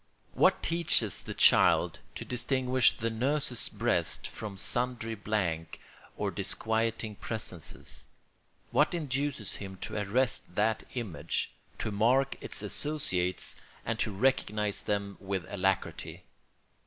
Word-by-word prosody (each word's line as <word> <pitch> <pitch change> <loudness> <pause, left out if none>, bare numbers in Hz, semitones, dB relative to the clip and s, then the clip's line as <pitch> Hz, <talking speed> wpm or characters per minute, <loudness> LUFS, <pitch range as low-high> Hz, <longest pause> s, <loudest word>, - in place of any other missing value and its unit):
What - - +4
teaches 165 - +3
the - - -6
child - - +5 0.2
to - - -6
distinguish 130 0 +2
the 115 0 -1
nurse's 130 +2 0
breast - - +1
from 105 -3 -6
sundry 120 +1 -1
blank 95 -6 -2 0.4
or - - -1
disquieting 110 -1 -1
presences? 100 -8 -4 0.6
What 150 +8 +3
induces 140 - -1
him 95 -1 -7
to 110 - -4
arrest 115 -2 0
that 110 +2 +1
image, 85 - -2 0.3
to 110 - -2
mark 125 +7 +3
its - - -2
associates, 95 -12 0 0.2
and 115 -1 -1
to - - +2
recognise 105 -2 +1
them 100 -1 -2
with 95 -3 -3
alacrity? 95 -1 -1
110 Hz, 115 wpm, -30 LUFS, 100-125 Hz, 0.6 s, child